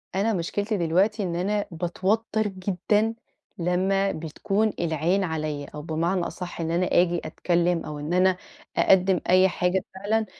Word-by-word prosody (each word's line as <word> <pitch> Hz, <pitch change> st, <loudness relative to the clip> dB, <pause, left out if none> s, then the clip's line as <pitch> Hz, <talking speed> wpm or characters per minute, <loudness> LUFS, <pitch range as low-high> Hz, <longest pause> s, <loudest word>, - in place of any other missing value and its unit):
أنا 210 Hz, +4 st, +1 dB
مشكلتي 205 Hz, +4 st, -1 dB
دلوقتي 190 Hz, +6 st, +1 dB
إن 175 Hz, -3 st, -2 dB
أنا 200 Hz, +4 st, 0 dB
باتوتر 200 Hz, +6 st, 0 dB
جدًا 200 Hz, +3 st, 0 dB, 0.4 s
لمّا 190 Hz, +3 st, +1 dB
بتكون 195 Hz, +7 st, -1 dB
العين 170 Hz, +4 st, +1 dB
عليَّ 155 Hz, -4 st, -3 dB
أو 150 Hz, -, -5 dB
بمعنى 165 Hz, +4 st, -1 dB
أصح 175 Hz, -2 st, -7 dB
إن 165 Hz, 0 st, -2 dB
أنا 175 Hz, +2 st, +1 dB
أجي 175 Hz, -1 st, +2 dB
أتكلّم 170 Hz, +1 st, 0 dB
أو 150 Hz, -1 st, -6 dB
إن 150 Hz, +4 st, -3 dB
أنا 185 Hz, 0 st, +3 dB, 0.4 s
أقدّم 190 Hz, -1 st, +4 dB
أي 185 Hz, +1 st, +6 dB
حاجة 180 Hz, +1 st, 0 dB
فعلًا 215 Hz, +3 st, 0 dB
180 Hz, 145 wpm, -25 LUFS, 170-200 Hz, 0.4 s, أي